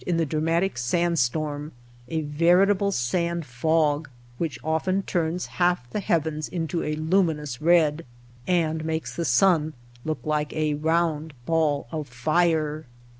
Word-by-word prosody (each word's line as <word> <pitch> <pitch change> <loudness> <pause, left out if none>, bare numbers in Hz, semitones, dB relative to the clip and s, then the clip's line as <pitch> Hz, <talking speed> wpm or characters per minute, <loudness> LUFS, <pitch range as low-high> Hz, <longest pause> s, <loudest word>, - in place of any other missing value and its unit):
in 175 -2 +1
the 165 - +2
dramatic 165 +2 0
sand 170 +7 +1
storm 150 +3 -1 0.2
— 120 - -26
a 160 +3 -2
veritable 180 +7 +3
sand 170 +4 -1
fog 150 +3 +1 0.3
which 160 -6 -2
often 175 +5 0
turns 170 0 -1 0.2
half 175 -8 +2
the - - -2
heavens 160 -4 -1
into 165 -1 -2
a 150 - -2
luminous 155 -5 0
red, 165 -1 +3 0.4
and 160 -3 +1
makes 160 0 -3
the 170 - -2
sun 155 +2 +3 0.3
look 155 -1 -2
like 150 -1 -1
a 155 -1 0
round 160 0 0
ball 155 -3 +1
of 155 -2 -4
fire. 155 +3 0
160 Hz, 140 wpm, -25 LUFS, 150-170 Hz, 0.4 s, veritable